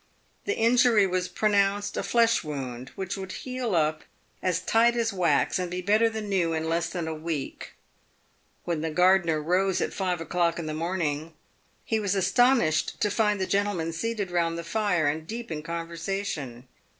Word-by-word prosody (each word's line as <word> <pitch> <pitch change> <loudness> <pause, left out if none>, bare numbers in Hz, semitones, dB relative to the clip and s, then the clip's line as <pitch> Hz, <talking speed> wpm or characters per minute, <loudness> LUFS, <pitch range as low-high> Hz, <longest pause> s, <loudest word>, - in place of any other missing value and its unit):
The 410 - -1
injury 230 -2 +4
was 180 -1 -1
pronounced 205 0 +1
a - - -1
flesh 230 -3 +2
wound, 130 -4 -5
which 190 +1 -4
would 190 -1 -6
heal 250 -5 -3
up 155 -1 +1 0.4
as 180 -1 +1
tight 230 +5 +3
as 230 -2 0
wax 170 -3 +2
and 180 -1 -2
be 180 +1 -4
better 215 +4 +3
than 220 -1 -5
new 180 -5 +1
in 160 0 -2
less 165 +1 0
than 170 -3 -4
a 160 - -2
week. 155 -3 -5 0.9
"When 170 -3 -2
the 160 - -1
gardener 175 -1 +3
rose 180 +4 +1
at - - -2
five 180 -3 -1
o'clock 170 +1 0
in 170 - -4
the 155 - -3
morning, 160 -2 -2 0.5
he 220 - 0
was 200 -2 0
astonished 195 -5 +2
to 210 - +1
find 210 -2 +1
the 190 - 0
gentlemen 195 -5 0
seated 210 0 -3
round 170 -1 0
the 170 - -5
fire 190 -4 0
and 155 +2 -2
deep 230 -1 -6
in 155 -1 -3
conversation. 165 -6 -4
180 Hz, 175 wpm, -27 LUFS, 160-205 Hz, 0.9 s, injury